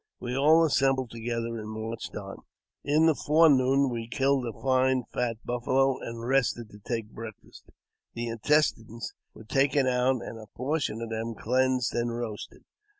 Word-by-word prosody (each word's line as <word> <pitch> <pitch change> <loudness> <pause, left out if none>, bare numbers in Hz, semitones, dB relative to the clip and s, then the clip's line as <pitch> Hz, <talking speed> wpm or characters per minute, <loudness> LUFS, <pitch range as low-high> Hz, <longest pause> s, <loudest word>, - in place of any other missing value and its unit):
We 125 0 -4
all 155 +4 +5
assembled 135 -4 +1
together 115 0 -3
and 110 0 -7
marched 110 +1 -6
on. - - -7 0.5
In 150 +3 +3
the 160 - +5
fore 155 +3 +4
noon 135 0 +3
we 115 -1 -4
killed 135 0 +1
a 115 - -7
fine 130 -1 +2
fat 120 -2 -1
buffalo, 130 +2 +1
and 115 0 -6
rested 125 -4 +1
to 105 - -13
take 115 0 -4
breakfast. 110 -2 -11 0.5
The 120 0 -3
intestines 115 -2 0 0.2
were 110 - -11
taken 135 +4 +2
out, 125 0 +1
and 115 - -7
a 110 - -11
portion 130 -4 -1
of 115 - -6
them 115 +1 -3
cleansed 130 +2 +1
and 120 0 -1
roasted. 110 -3 -6
125 Hz, 160 wpm, -28 LUFS, 115-135 Hz, 0.5 s, all